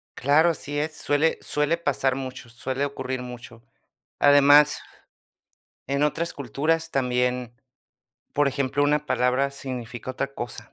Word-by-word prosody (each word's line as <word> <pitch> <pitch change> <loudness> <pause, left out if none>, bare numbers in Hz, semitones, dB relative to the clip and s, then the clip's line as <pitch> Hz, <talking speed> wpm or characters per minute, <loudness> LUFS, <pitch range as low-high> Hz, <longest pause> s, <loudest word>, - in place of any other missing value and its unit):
Claro, 145 +6 +4
así 145 -2 -3
es, 155 +1 -2
suele 150 +3 +1
suele 150 +3 0
pasar 135 -4 0
mucho, 130 -2 -7
suele 130 +3 -3
ocurrir 130 -2 -4
mucho. 120 -2 -10 0.6
Además, 145 +1 +6 1.1
en 140 +2 0
otras 165 +3 0
culturas 155 +5 -1
también, 125 -2 0 0.8
por 145 -1 +2
ejemplo, 140 +1 -1
una 150 +1 +1
palabra 125 +2 +1
significa 125 -3 -6
otra 135 +2 -4
cosa. 115 -3 -7
140 Hz, 125 wpm, -25 LUFS, 125-145 Hz, 1.1 s, Además